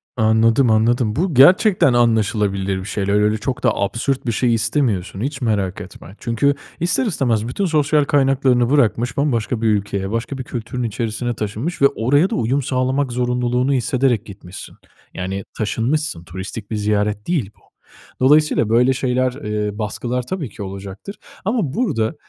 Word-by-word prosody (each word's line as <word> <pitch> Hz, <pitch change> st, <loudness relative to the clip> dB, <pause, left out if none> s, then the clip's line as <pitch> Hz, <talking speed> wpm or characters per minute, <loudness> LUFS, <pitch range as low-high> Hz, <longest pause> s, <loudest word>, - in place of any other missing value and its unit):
Anladım, 115 Hz, +2 st, +3 dB
anladım. 110 Hz, 0 st, +2 dB
Bu 175 Hz, +3 st, 0 dB
gerçekten 175 Hz, -, +5 dB
anlaşılabilir 105 Hz, -5 st, +1 dB
bir 95 Hz, -, -7 dB
şeyler. 100 Hz, -1 st, -2 dB
Öyle 105 Hz, +1 st, +2 dB
çok 125 Hz, +4 st, -4 dB
da 120 Hz, -, +2 dB
absürt 125 Hz, +7 st, -1 dB
bir 120 Hz, -, 0 dB
şey 120 Hz, +2 st, +1 dB
istemiyorsun 110 Hz, -5 st, -1 dB
hiç 135 Hz, +2 st, -3 dB
merak 105 Hz, -4 st, -1 dB
etme. 95 Hz, 0 st, -12 dB
Çünkü 130 Hz, +5 st, +1 dB, 0.2 s
ister 175 Hz, +9 st, +1 dB
istemez 120 Hz, -, 0 dB
bütün 195 Hz, +11 st, -2 dB
sosyal 150 Hz, -3 st, +2 dB
kaynaklarını 135 Hz, -4 st, +2 dB
bırakmış, 120 Hz, -3 st, +1 dB
bambaşka 120 Hz, -5 st, 0 dB
bir 115 Hz, -, +1 dB
ülkeye, 100 Hz, -1 st, -1 dB
başka 115 Hz, +4 st, -3 dB
bir 130 Hz, -, -5 dB
kültürün 120 Hz, +1 st, -5 dB
içerisine 115 Hz, +1 st, -2 dB
taşınmış 110 Hz, -, -4 dB
ve 140 Hz, -, +8 dB
oraya 145 Hz, +11 st, +1 dB
da -, -, -2 dB
uyum 125 Hz, +5 st, 0 dB
sağlamak 130 Hz, +1 st, -1 dB
zorunluluğunu 125 Hz, +2 st, 0 dB
hissederek 130 Hz, -3 st, +1 dB
gitmişsin. 95 Hz, -2 st, -11 dB, 0.4 s
Yani 95 Hz, +1 st, -4 dB
taşınmışsın. 115 Hz, -, -1 dB
Turistik 95 Hz, +5 st, -8 dB
bir -, -, -1 dB
ziyaret 105 Hz, 0 st, -1 dB
değil 140 Hz, -, -1 dB
bu. -, -, -29 dB, 0.6 s
Dolayısıyla 145 Hz, -4 st, +3 dB
böyle 125 Hz, +3 st, +4 dB
şeyler, 130 Hz, -1 st, 0 dB
eee, 105 Hz, -6 st, -3 dB
baskılar 120 Hz, +3 st, -3 dB
tabii 170 Hz, -, -4 dB
ki 100 Hz, -, -8 dB
olacaktır 100 Hz, -, -8 dB, 0.3 s
ama 205 Hz, -, 0 dB
burada, 160 Hz, -, -1 dB
120 Hz, 155 wpm, -19 LUFS, 105-135 Hz, 0.6 s, ve